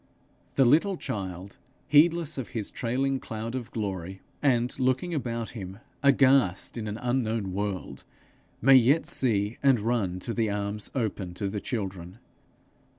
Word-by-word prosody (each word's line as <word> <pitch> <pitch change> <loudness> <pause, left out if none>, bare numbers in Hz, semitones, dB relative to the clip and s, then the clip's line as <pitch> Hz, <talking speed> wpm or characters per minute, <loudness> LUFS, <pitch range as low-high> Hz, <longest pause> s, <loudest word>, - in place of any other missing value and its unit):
The 135 - +5
little 165 +9 +4
child, 95 - -5 0.3
heedless 155 0 +4
of 125 - -4
his 105 - -4
trailing 135 +3 -1
cloud 115 0 -6
of 125 -3 -4
glory, 95 -4 -4 0.2
and 125 -4 +2
looking 130 +7 +1
about 115 -6 -3
him 95 -4 -7 0.2
aghast 135 -8 +4
in 110 -2 -4
an 105 +1 -4
unknown 115 -6 -1
world, 100 -1 -4 0.6
may 135 +2 +7
yet 135 +5 +5
see 105 -3 0
and 135 -4 +4
run 105 -5 0
to 115 - -4
the 115 -2 0
arms 100 +1 -3
open 100 -7 -2
to 100 +2 -2
the 100 0 -4
children. 95 -5 -5
115 Hz, 145 wpm, -27 LUFS, 100-130 Hz, 0.6 s, may